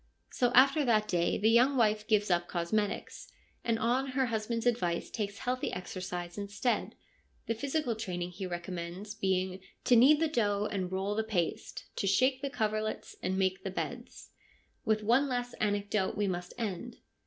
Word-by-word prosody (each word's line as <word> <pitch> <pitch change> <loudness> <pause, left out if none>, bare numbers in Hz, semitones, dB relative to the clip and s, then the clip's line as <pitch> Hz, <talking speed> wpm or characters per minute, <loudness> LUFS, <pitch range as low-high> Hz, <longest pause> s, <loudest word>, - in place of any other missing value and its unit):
So 245 -1 +1
after 275 +4 +6
that 215 -4 +3
day 175 -1 +1
the 215 - +2
young 255 +4 +5
wife 215 -2 +2
gives 210 -3 +2
up 175 0 +2
cosmetics, 200 +4 -2 0.3
and 230 -1 +1
on 245 +4 +1
her 265 0 +1
husband's 230 0 -2
advice 180 -8 0
takes 205 -2 -3
healthy 255 +1 -2
exercise 180 0 -5
instead; 205 +5 -1 0.5
the 230 - 0
physical 265 +1 -1
training 180 -5 -4
he 185 +1 -5
recommends 175 +3 -5
being 190 -1 -1
' - - -38
to 245 - +6
knead 275 +6 +7
the 325 - +2
dough 210 -7 +1
and 185 -3 -2
roll 190 +2 -1
the 220 +1 0
paste; 195 -6 -2
to 195 - 0
shake 255 +7 +3
the 280 - -2
coverlets 215 -4 -2
and 185 +1 -1
make 190 0 0
the 195 - -2
beds.' 240 +6 -6 0.5
With 215 -1 +1
one 240 +6 +4
last 245 -2 -2
anecdote 205 -1 0
we 205 - +1
must 180 -2 -3
end. 225 +1 -4
215 Hz, 170 wpm, -31 LUFS, 190-240 Hz, 0.5 s, knead